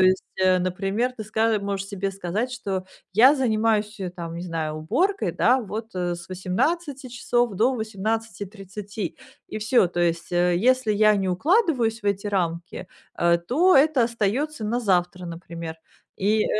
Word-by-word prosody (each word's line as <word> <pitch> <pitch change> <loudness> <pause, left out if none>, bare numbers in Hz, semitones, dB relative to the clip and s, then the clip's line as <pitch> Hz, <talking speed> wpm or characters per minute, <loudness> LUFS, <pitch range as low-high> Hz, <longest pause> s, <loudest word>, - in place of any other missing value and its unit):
есть, 185 0 +4
э, 185 -1 +4
например, 195 +7 -1
ты 215 - -6
ска 220 +1 +1
можешь 200 -1 -3
себе 195 -1 -2
сказать, 195 +7 -3
что: 195 -7 -3 0.3
"Я 250 +8 +7
занимаюсь, 220 -4 +1
э, 185 -2 -3
там 170 -2 -7
не 170 - -5
знаю, 160 -3 -3
уборкой, 305 - 0
да, 255 +1 +3
вот, 220 +1 -6
э, 175 -1 -1
с 170 -1 -10
18 265 - -2
часов 240 -2 0
до 235 +7 +3
18:30". 210 -2 -4 0.3
И - - -4
всё. 215 -2 +3
То 175 0 -3
есть, 170 -1 0
э, 175 0 +3
если 250 +2 +3
я 215 +1 +5
не 190 -1 -1
укладываюсь 245 - +2
в - - -5
эти 200 0 0
рамки, 175 -2 -2 0.3
а, 170 0 +3
то 285 - +3
это 275 -3 +4
остаётся 235 +5 -1
на 235 +3 0
завтра, 180 -4 0
например. 170 -1 -7 0.4
И, 210 +2 +2
э, - - 0
205 Hz, 165 wpm, -24 LUFS, 180-235 Hz, 0.4 s, Я